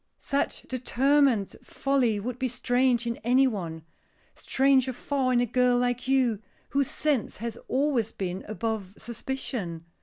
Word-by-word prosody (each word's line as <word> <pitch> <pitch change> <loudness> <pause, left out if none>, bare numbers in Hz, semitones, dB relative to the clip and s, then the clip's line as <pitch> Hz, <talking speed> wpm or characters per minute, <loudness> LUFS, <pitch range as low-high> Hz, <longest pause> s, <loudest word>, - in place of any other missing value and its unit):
"Such 280 0 -2
determined 255 -3 +2
folly 255 -6 0
would 245 +4 -5
be 260 - +1
strange 245 0 +1
in 235 0 -2
any 250 +4 +3
one; 170 -10 -3 0.5
stranger 265 -1 +2
far 265 0 -1
in 245 - +3
a 245 - +3
girl 250 +1 +2
like 245 0 0
you, 255 -6 +2 0.3
whose 280 -1 +1
sense 290 -7 0
has 230 0 -4
always 260 -5 +1
been 185 0 -4
above 215 -3 -3
suspicion." 230 - -4
245 Hz, 140 wpm, -27 LUFS, 220-265 Hz, 0.5 s, any